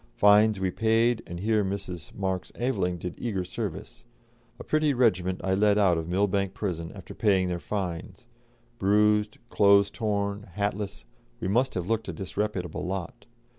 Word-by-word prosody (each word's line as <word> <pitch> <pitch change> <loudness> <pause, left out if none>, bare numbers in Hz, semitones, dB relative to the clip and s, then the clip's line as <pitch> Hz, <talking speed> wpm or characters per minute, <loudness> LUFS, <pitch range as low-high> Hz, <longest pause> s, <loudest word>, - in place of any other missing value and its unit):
Fines 105 0 +5
we 95 -1 0
paid, 115 +3 +2
and 85 0 -6
here 110 0 +2
Mrs. 95 -3 -5
Marx 95 -2 -2
Aveling 100 -8 -1
did 90 +1 -5
eager 100 -6 -2
service. 105 +4 -6 0.6
A - - -7
pretty 155 -2 +1
regiment 95 -7 +2
I 95 - +1
led 105 +1 +3
out 95 -4 +4
of 80 +1 -5
Millbank 100 +1 0
Prison, 85 -5 -3
after - - -10
paying 95 -4 +2
their 90 -1 -2
fines; 95 +4 -5 0.5
bruised, 105 +1 +3
clothes 100 -1 +5
torn, 100 -2 -2
hatless, 100 -1 -3 0.3
we - - -3
must 125 +7 +1
have 90 -2 -2
looked 110 +3 -1
a - - -4
disreputable 95 -3 -3
lot. 95 +2 -5
100 Hz, 155 wpm, -27 LUFS, 95-105 Hz, 0.6 s, Fines